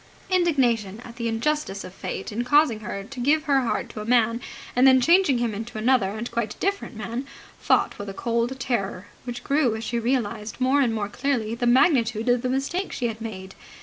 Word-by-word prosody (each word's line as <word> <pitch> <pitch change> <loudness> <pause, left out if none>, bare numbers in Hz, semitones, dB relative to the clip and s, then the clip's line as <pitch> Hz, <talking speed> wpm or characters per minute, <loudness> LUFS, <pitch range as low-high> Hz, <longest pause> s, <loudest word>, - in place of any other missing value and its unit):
Indignation 245 - +2
at 235 -1 -11
the 235 -1 -2
injustice 225 -3 -1
of 185 - -9
Fate 190 - -5
in 230 +3 -2
causing 290 -3 +3
her 200 -1 -5
to 255 +5 -10
give 300 +5 +2
her 280 -3 +3
heart 240 - -1
to 215 - -7
a - - -6
man 230 0 +2 0.3
and 255 +2 +6
then 260 0 +7
changing 335 -1 +4
him 235 -2 -1
into 220 +2 -6
another 225 -3 +2
and 235 +2 -5
quite 230 -3 -3
different 395 - -2
man 230 +5 -5 0.3
fought - - +1
with 205 0 -5
a - - -6
cold 235 +3 -1
terror, 200 -7 -2 0.2
which 245 -1 -6
grew 275 -5 +2
as 220 - -5
she 235 0 -1
realized 230 -3 -2
more 260 +3 +3
and 235 -4 +1
more 205 -2 -2
clearly 240 -1 -1
the 240 +1 -1
magnitude 240 -3 +3
of 245 -1 +3
the 255 - -1
mistake 275 +9 -2
she 240 -2 -1
had 225 0 -7
made. 190 -4 -7
240 Hz, 210 wpm, -24 LUFS, 220-265 Hz, 0.3 s, then